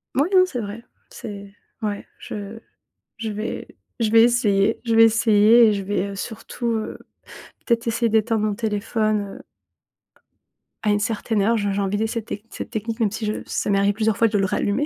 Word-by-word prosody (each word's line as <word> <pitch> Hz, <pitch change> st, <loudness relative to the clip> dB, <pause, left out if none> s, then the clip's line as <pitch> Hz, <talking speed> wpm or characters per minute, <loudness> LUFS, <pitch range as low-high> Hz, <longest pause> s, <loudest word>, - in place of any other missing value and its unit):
Moui, 285 Hz, +6 st, +2 dB
non, 370 Hz, -, +7 dB
c'est 265 Hz, -10 st, -5 dB
vrai. 210 Hz, +3 st, -7 dB, 0.3 s
C'est 200 Hz, -2 st, -9 dB, 0.3 s
ouais, 205 Hz, -2 st, -3 dB
je 210 Hz, +2 st, -7 dB, 0.6 s
je 230 Hz, -1 st, -4 dB
vais 215 Hz, +2 st, -5 dB, 0.3 s
je 220 Hz, -2 st, +1 dB
vais 225 Hz, +1 st, +7 dB
essayer, 220 Hz, -3 st, +2 dB
je 230 Hz, -2 st, 0 dB
vais 225 Hz, -, +8 dB
essayer 225 Hz, 0 st, +5 dB
et 215 Hz, -, +3 dB
je 200 Hz, -, -3 dB
vais, 200 Hz, 0 st, -1 dB
heu, 200 Hz, -, -7 dB
surtout, 225 Hz, +3 st, -5 dB
heu, 220 Hz, -1 st, -3 dB, 0.7 s
peut-être 235 Hz, -1 st, 0 dB
essayer 230 Hz, 0 st, +1 dB
d'éteindre 220 Hz, 0 st, +1 dB
mon 210 Hz, -, -1 dB
téléphone, 215 Hz, -1 st, -1 dB
heu -, -, -14 dB, 1.4 s
à 210 Hz, -, +3 dB
une 205 Hz, -, +2 dB
certaine 220 Hz, -1 st, -1 dB
heure, 225 Hz, +4 st, +3 dB
je 205 Hz, -2 st, -1 dB
j'ai 195 Hz, -, -1 dB
envie 195 Hz, +1 st, -1 dB
d'ess 220 Hz, +1 st, -1 dB
cette 230 Hz, -3 st, -3 dB
tech 205 Hz, -, -6 dB
cette -, -, -7 dB
technique 225 Hz, 0 st, -4 dB
même 215 Hz, -3 st, +2 dB
si 220 Hz, +2 st, -5 dB
je 210 Hz, -, -1 dB
ça -, -, -2 dB
m'est 200 Hz, -, +3 dB
arrivée 200 Hz, +1 st, +2 dB
plusieurs 215 Hz, 0 st, 0 dB
fois 230 Hz, -, +4 dB
de 210 Hz, -1 st, 0 dB
le 195 Hz, -, +2 dB
rallumer 205 Hz, +8 st, 0 dB
215 Hz, 200 wpm, -22 LUFS, 205-230 Hz, 1.4 s, vais